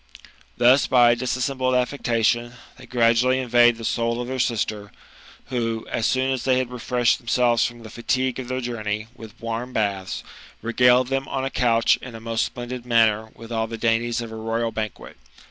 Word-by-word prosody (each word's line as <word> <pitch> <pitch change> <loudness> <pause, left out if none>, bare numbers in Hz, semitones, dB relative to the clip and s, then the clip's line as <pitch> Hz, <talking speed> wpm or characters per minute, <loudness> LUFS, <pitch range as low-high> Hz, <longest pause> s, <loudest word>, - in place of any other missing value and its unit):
Thus, 125 +3 +5
by 120 -2 +5
a - - +3
dissembled 130 +1 -1
affection, 120 -2 0 0.2
they - - -14
gradually 120 +1 +3
invade 120 -2 +4
the 115 - -7
soul 115 +1 0
of 125 0 -4
dieir 130 -1 -1
sister, 105 -3 -2 0.6
who, 115 -3 -2
as 115 - 0
soon 130 +1 +1
as 130 -2 -2
they 130 -1 +2
had 130 -1 -2
refreshed 125 0 +1
them 120 - -22
selves 120 -2 +3
from 120 -1 -11
the 110 - -9
fatigue 130 +2 -1
of 130 - -6
their 130 +1 -3
journey 110 -3 -4
with 110 -1 -12
warm 115 +2 -4
baths, 100 -3 -2 0.4
regaled 125 +2 +4
them 135 0 -1
on 135 0 -2
a 135 - -3
couch 115 -2 +3
in 125 -3 -9
a - - -7
most 115 0 -1
splendid 120 0 -7
manner 110 -2 +2
with 115 +1 -12
all 110 -1 -1
the 115 0 -6
dainties 115 +1 0
of 115 -1 -7
a - - -7
royal 115 +1 -2
banquet. 110 -8 -6
120 Hz, 190 wpm, -23 LUFS, 115-125 Hz, 0.6 s, Thus